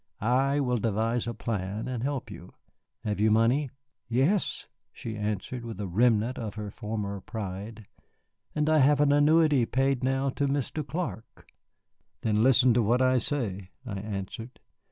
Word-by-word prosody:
I 135 Hz, +5 st, +2 dB
will 125 Hz, -3 st, +1 dB
devise 115 Hz, +2 st, 0 dB
a 120 Hz, -, -2 dB
plan 105 Hz, -1 st, -3 dB
and 125 Hz, -3 st, -3 dB
help 135 Hz, 0 st, -3 dB
you. -, -, -11 dB, 0.5 s
Have 105 Hz, -3 st, -2 dB
you 110 Hz, +1 st, +4 dB
money?" 120 Hz, +6 st, +3 dB, 0.4 s
"Yes," 135 Hz, -, +1 dB, 0.3 s
she 110 Hz, -1 st, -7 dB
answered, 105 Hz, +3 st, -3 dB
with 115 Hz, -2 st, -7 dB
a 105 Hz, -, -2 dB
remnant 115 Hz, +5 st, +2 dB
of 110 Hz, -3 st, -5 dB
her 105 Hz, -2 st, -5 dB
former 105 Hz, -3 st, -4 dB
pride; 105 Hz, +2 st, -6 dB, 0.7 s
"and 150 Hz, 0 st, +1 dB
I 155 Hz, 0 st, +4 dB
have 145 Hz, +1 st, +4 dB
an 145 Hz, -1 st, +4 dB
annuity 145 Hz, -3 st, +4 dB
paid 135 Hz, 0 st, +1 dB
now 135 Hz, +1 st, +1 dB
to 140 Hz, +2 st, -1 dB
Mr. 140 Hz, +2 st, -1 dB
Clark." 155 Hz, -6 st, -6 dB, 0.7 s
"Then 105 Hz, -1 st, +1 dB
listen 130 Hz, 0 st, +5 dB
to 120 Hz, -, +3 dB
what 120 Hz, +4 st, +2 dB
I 130 Hz, 0 st, +4 dB
say," 105 Hz, -8 st, 0 dB, 0.2 s
I 100 Hz, -5 st, -4 dB
answered. 105 Hz, +3 st, -6 dB
120 Hz, 155 wpm, -28 LUFS, 105-135 Hz, 0.7 s, listen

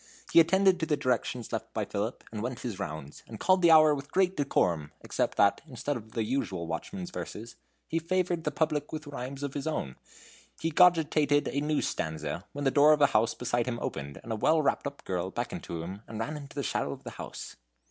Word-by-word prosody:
He -, -, +9 dB
attended 190 Hz, +2 st, +5 dB
to 160 Hz, -, -1 dB
the 150 Hz, -2 st, +2 dB
directions 125 Hz, -3 st, -1 dB
left 110 Hz, 0 st, -4 dB
by 110 Hz, -2 st, 0 dB
Philip, 105 Hz, +5 st, -3 dB
and 110 Hz, -2 st, -4 dB
went 125 Hz, +1 st, -4 dB
his 115 Hz, -6 st, -4 dB
rounds, 80 Hz, -6 st, -6 dB
and -, -, -9 dB
called 185 Hz, 0 st, +4 dB
the 170 Hz, -, +6 dB
hour 155 Hz, -1 st, +8 dB
with 140 Hz, 0 st, -6 dB
great 190 Hz, 0 st, +2 dB
decorum, 85 Hz, -, +1 dB
except -, -, -1 dB
that, 100 Hz, 0 st, +4 dB
instead 135 Hz, +1 st, -3 dB
of 110 Hz, -2 st, -9 dB
the 115 Hz, -, 0 dB
usual 105 Hz, -7 st, -2 dB
watchman's 175 Hz, -, -5 dB
verses, 115 Hz, -7 st, -7 dB, 0.3 s
he 165 Hz, -, 0 dB
favored 175 Hz, 0 st, 0 dB
the -, -, +1 dB
public 150 Hz, -2 st, -1 dB
with 155 Hz, 0 st, -5 dB
rhymes 140 Hz, 0 st, -6 dB
of 140 Hz, -1 st, -3 dB
his 145 Hz, +2 st, -3 dB
own. 70 Hz, -, -3 dB, 0.6 s
He 165 Hz, -, 0 dB
was -, -, -9 dB
cogitating 155 Hz, -4 st, +4 dB
a 140 Hz, -, -1 dB
new 150 Hz, 0 st, 0 dB
stanza, 80 Hz, +3 st, -3 dB
when 145 Hz, 0 st, -4 dB
the 135 Hz, -, +4 dB
door 150 Hz, +2 st, +7 dB
of 150 Hz, -, +1 dB
a -, -, +9 dB
house 110 Hz, +1 st, +3 dB
beside 120 Hz, -1 st, -1 dB
him 120 Hz, -2 st, -1 dB
opened, 70 Hz, 0 st, -5 dB
and 115 Hz, -, -7 dB
a -, -, 0 dB
well 155 Hz, +9 st, +3 dB
wrapped 140 Hz, -3 st, +1 dB
up -, -, -8 dB
girl -, -, -2 dB
beckoned -, -, -4 dB
to 85 Hz, -1 st, -4 dB
him, 95 Hz, +4 st, -7 dB
and 110 Hz, -1 st, -6 dB
ran 115 Hz, +7 st, -2 dB
into 145 Hz, -2 st, -9 dB
the 140 Hz, -, -2 dB
shadow -, -, -1 dB
of -, -, -12 dB
the -, -, -7 dB
house. -, -, -8 dB
140 Hz, 230 wpm, -29 LUFS, 110-155 Hz, 0.6 s, He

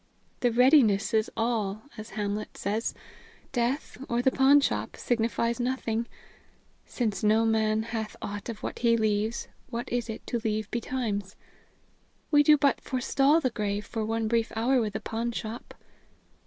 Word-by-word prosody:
'The 245 Hz, -, +2 dB
readiness 235 Hz, -4 st, +4 dB
is 220 Hz, 0 st, +2 dB
all,' 220 Hz, -3 st, -1 dB
as 215 Hz, 0 st, -8 dB
Hamlet 210 Hz, 0 st, -3 dB
says. 210 Hz, +4 st, -2 dB, 0.6 s
Death, 250 Hz, +3 st, -1 dB
or 235 Hz, -, +1 dB
the 265 Hz, -, +4 dB
pawnshop, 275 Hz, +2 st, +3 dB
signifies 235 Hz, 0 st, 0 dB
nothing. 235 Hz, -2 st, -1 dB, 0.8 s
'Since 215 Hz, -6 st, -2 dB
no 215 Hz, +2 st, +4 dB
man 220 Hz, -1 st, +2 dB
has 220 Hz, -1 st, -4 dB
aught 205 Hz, +3 st, -6 dB
of 225 Hz, -2 st, -7 dB
what -, -, -4 dB
he 230 Hz, -1 st, +3 dB
leaves, 215 Hz, +1 st, 0 dB, 0.2 s
what 235 Hz, +1 st, -4 dB
is 240 Hz, -1 st, -1 dB
it 220 Hz, -, -6 dB
to 235 Hz, -, -2 dB
leave 215 Hz, -1 st, -2 dB
betimes?' 220 Hz, -5 st, -3 dB, 1.0 s
We 295 Hz, -1 st, +7 dB
do 300 Hz, +1 st, +6 dB
but 280 Hz, -1 st, +2 dB
forestall 275 Hz, +4 st, +2 dB
the 255 Hz, -4 st, 0 dB
grave 210 Hz, -2 st, -2 dB
for 225 Hz, -2 st, -3 dB
one 225 Hz, 0 st, -1 dB
brief 230 Hz, 0 st, +1 dB
hour 245 Hz, +3 st, +2 dB
with 210 Hz, -2 st, -2 dB
the 215 Hz, -, -4 dB
pawnshop." 230 Hz, 0 st, -4 dB
225 Hz, 150 wpm, -28 LUFS, 215-245 Hz, 1.0 s, We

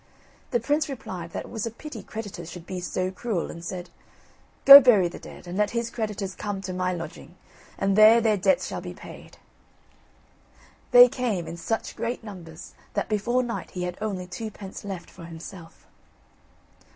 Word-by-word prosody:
The 240 Hz, -, +1 dB
prince 290 Hz, +5 st, 0 dB
replied 185 Hz, -10 st, -6 dB
that -, -, -6 dB
it -, -, -13 dB
was 225 Hz, -1 st, -3 dB
a -, -, -2 dB
pity 235 Hz, 0 st, -9 dB
creditors 205 Hz, -6 st, -7 dB
should 175 Hz, -2 st, -10 dB
be 185 Hz, 0 st, -5 dB
so 185 Hz, +1 st, -2 dB
cruel, 200 Hz, -3 st, -3 dB
and 170 Hz, -, -10 dB
said: 180 Hz, 0 st, -6 dB, 0.7 s
"Go 275 Hz, 0 st, +14 dB
bury 215 Hz, -8 st, +5 dB
the 170 Hz, -, -9 dB
dead, -, -, -12 dB
and 175 Hz, +1 st, -6 dB
let 210 Hz, -1 st, +3 dB
his 235 Hz, 0 st, -2 dB
creditors 210 Hz, -4 st, -3 dB
come 205 Hz, 0 st, -4 dB
to 185 Hz, -1 st, -5 dB
my 185 Hz, 0 st, -1 dB
lodging, 170 Hz, 0 st, -7 dB, 0.4 s
and 195 Hz, 0 st, +1 dB
there 215 Hz, +2 st, +8 dB
their 220 Hz, -2 st, +2 dB
debts 190 Hz, -1 st, +2 dB
shall -, -, -5 dB
be -, -, -8 dB
paid." -, -, -12 dB, 1.5 s
They 245 Hz, 0 st, +9 dB
came, 235 Hz, -8 st, -2 dB
in 165 Hz, -, -7 dB
such 225 Hz, +6 st, -3 dB
great 235 Hz, 0 st, -3 dB
numbers 175 Hz, -6 st, -10 dB, 0.2 s
that -, -, -1 dB
before 240 Hz, +4 st, +1 dB
night 235 Hz, -1 st, -5 dB
he 180 Hz, -, -5 dB
had 180 Hz, 0 st, -4 dB
only 195 Hz, -4 st, -3 dB
twopence 195 Hz, +1 st, -8 dB
left 195 Hz, -4 st, -7 dB
for 170 Hz, -, -11 dB
himself. 165 Hz, +1 st, -11 dB
195 Hz, 175 wpm, -25 LUFS, 180-230 Hz, 1.5 s, Go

